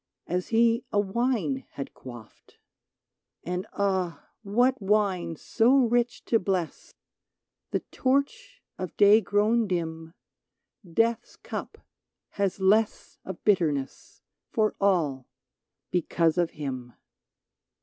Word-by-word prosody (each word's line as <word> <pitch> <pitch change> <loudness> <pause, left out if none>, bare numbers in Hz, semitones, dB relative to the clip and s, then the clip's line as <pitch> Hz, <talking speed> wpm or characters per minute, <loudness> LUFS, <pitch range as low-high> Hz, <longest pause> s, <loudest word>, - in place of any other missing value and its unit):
As 180 +1 -2
he 230 +1 +3
a 205 - +2
wine 205 - 0
had 140 - -6
quaffed; 120 -4 -13 0.9
And, 180 +1 -3
ah! 190 -4 -1
what 245 +5 +2
wine 190 -4 +1
so 235 - +2
rich 240 -2 +2
to 225 - +3
bless? 185 -4 -3 0.8
The - - -1
torch 280 - -1 0.2
of 185 -3 -6
day 205 +2 +7
grown 215 +2 +2
dim, 165 -2 -4 0.7
Death's 225 +6 0
cup - - -7 0.5
has 200 -1 -1
less 210 +3 +1
of 190 -2 -8
bitterness 155 -9 0 0.3
For 215 -1 +1
all, 160 -10 +1 0.6
because 170 -1 +1
of 175 -2 +2
him 130 -4 -5
195 Hz, 105 wpm, -27 LUFS, 165-225 Hz, 0.9 s, day